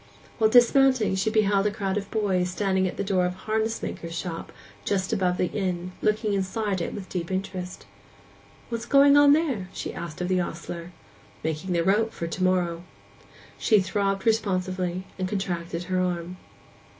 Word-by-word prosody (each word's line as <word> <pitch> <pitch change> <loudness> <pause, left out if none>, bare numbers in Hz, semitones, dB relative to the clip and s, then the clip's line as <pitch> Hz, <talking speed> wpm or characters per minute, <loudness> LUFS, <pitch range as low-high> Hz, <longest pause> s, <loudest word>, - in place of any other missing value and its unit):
While 220 -1 +5
dismounting 245 -1 +5
she 190 +3 +1
beheld 205 -2 +3
a - - +2
crowd 195 -2 -2
of 205 -1 -3
boys 190 -5 0
standing 190 0 +1
at - - -6
the - - -1
door 190 -2 +1
of 180 - -3
a - - -16
harness 220 +1 -1
maker's 165 0 -5
shop 165 0 -5 0.3
just 190 -2 -1
above 180 -2 +1
the - - +2
inn, 185 -3 -2
looking 215 0 +1
inside 195 0 -1
it - - -3
with 195 -3 -7
deep 175 -2 -4
interest. 185 -1 -4 0.8
'What 230 -1 -2
is 235 - -9
going 280 +3 +6
on 290 0 +7
there?' 270 - 0
she - - -5
asked 170 -3 -7
of 180 - -1
the 185 0 +2
ostler. 170 0 -6 0.5
'Making 160 +4 -2
the 170 -1 +2
rope 215 +5 +2
for 170 - -4
to 175 +3 -3
morrow.' 175 -2 +1 0.8
She 215 - +4
throbbed 195 0 -1
responsively, 185 -4 0 0.2
and 185 0 -1
contracted 175 -4 -3
her 185 +1 -1
arm. 180 0 -2
190 Hz, 175 wpm, -26 LUFS, 180-215 Hz, 0.8 s, on